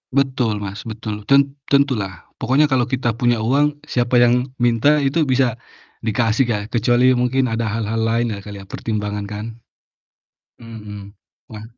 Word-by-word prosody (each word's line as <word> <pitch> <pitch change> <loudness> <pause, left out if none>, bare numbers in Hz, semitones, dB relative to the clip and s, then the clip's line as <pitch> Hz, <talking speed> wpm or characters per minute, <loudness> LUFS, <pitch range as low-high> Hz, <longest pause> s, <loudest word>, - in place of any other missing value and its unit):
Betul 125 -6 +1
Mas, 100 +3 -7
betul. 105 -2 -6
Ten 140 0 +4 0.2
tentulah. 120 - 0
Pokoknya 140 +5 +3
kalau 125 -2 +3
kita 125 -2 0
punya 120 -3 +2
uang, 145 +4 +1
siapa 120 0 -1
yang 125 +1 +3
minta 120 +5 +3
itu 140 +5 +1
bisa 130 -3 +1 0.5
dikasih 115 +3 +1
ya, 110 -3 0
kecuali 120 +2 +3
mungkin 125 +2 +1
ada 115 0 -1
hal-hal 115 +1 -2
lain 115 0 0
ya 100 - -5
kali 105 -1 -8
ya, 95 - -12
pertimbangan 105 -2 -3
kan. 105 +1 -6 1.2
Mhm. 105 -3 -9 0.4
Wah. 110 -1 -9
120 Hz, 150 wpm, -20 LUFS, 105-130 Hz, 1.2 s, Ten